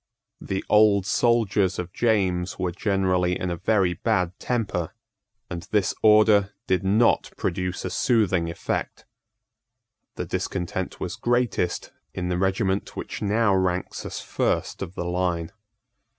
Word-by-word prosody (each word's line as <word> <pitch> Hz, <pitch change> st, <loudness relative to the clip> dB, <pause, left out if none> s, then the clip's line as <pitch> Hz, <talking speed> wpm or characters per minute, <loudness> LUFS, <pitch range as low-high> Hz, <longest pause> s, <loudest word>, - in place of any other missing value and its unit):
The 95 Hz, 0 st, -3 dB
old 105 Hz, -2 st, +5 dB
soldiers 110 Hz, -4 st, +2 dB
of 90 Hz, 0 st, -5 dB
James 95 Hz, -6 st, +1 dB
were 90 Hz, -2 st, -1 dB
generally 95 Hz, -2 st, 0 dB
in 90 Hz, -, -2 dB
a -, -, -1 dB
very 95 Hz, 0 st, +2 dB
bad 90 Hz, 0 st, 0 dB
temper; 105 Hz, -9 st, -2 dB, 0.5 s
and 85 Hz, -, -5 dB
this 105 Hz, -3 st, +1 dB
order 105 Hz, -2 st, +5 dB
did 95 Hz, 0 st, +1 dB
not 105 Hz, +5 st, +3 dB
produce 90 Hz, 0 st, -2 dB
a -, -, -3 dB
soothing 95 Hz, -9 st, +2 dB
effect. 85 Hz, -, -4 dB, 1.1 s
The -, -, -4 dB
discontent 95 Hz, 0 st, -3 dB
was 90 Hz, -2 st, -4 dB
greatest 120 Hz, -7 st, 0 dB, 0.2 s
in 90 Hz, -1 st, -2 dB
the 90 Hz, 0 st, 0 dB
regiment 95 Hz, 0 st, 0 dB
which -, -, -6 dB
now 105 Hz, 0 st, +2 dB
ranks 95 Hz, -1 st, -1 dB
as -, -, -5 dB
first -, -, -1 dB
of 90 Hz, -, -6 dB
the 85 Hz, -, -3 dB
line. 90 Hz, -2 st, -1 dB
95 Hz, 135 wpm, -25 LUFS, 90-105 Hz, 1.1 s, old